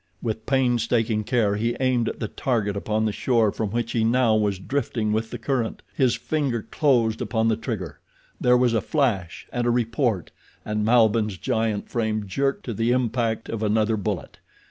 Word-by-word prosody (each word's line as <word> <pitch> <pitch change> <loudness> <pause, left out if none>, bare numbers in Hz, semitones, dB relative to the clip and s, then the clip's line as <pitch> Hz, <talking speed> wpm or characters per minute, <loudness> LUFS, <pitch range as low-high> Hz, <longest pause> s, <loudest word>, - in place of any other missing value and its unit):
With 110 0 -4
painstaking 120 -4 +1
care 105 -5 +1
he 115 +2 -1
aimed 130 -3 +1
at - - -7
the 110 - -2
target 105 -4 -1
upon 110 +2 -1
the 110 - +1
shore 115 -1 +2
from 110 0 -3
which 115 +2 -2
he 115 - +1
now 115 -1 +3
was 105 -2 +1
drifting 115 -1 -2
with 110 +1 -1
the 120 - -5
current. 120 -1 -2
His 130 -3 +2
finger 135 -8 -1
closed 120 -7 +1
upon 115 -1 +1
the 110 - +2
trigger—there 110 - -2
was 125 -1 +3
a 110 - +2
flash 105 - -1
and 120 0 0
a - - +3
report, 115 - 0 0.3
and 105 0 -1
Malbihn's 110 -3 +3
giant 110 +1 -1
frame 110 -3 -1
jerked 135 +8 -1
to 120 - -3
the 115 +3 0
impact 120 -2 0
of 115 -1 -4
another 110 +1 +2
bullet. 100 -3 -4
115 Hz, 175 wpm, -24 LUFS, 110-120 Hz, 0.3 s, now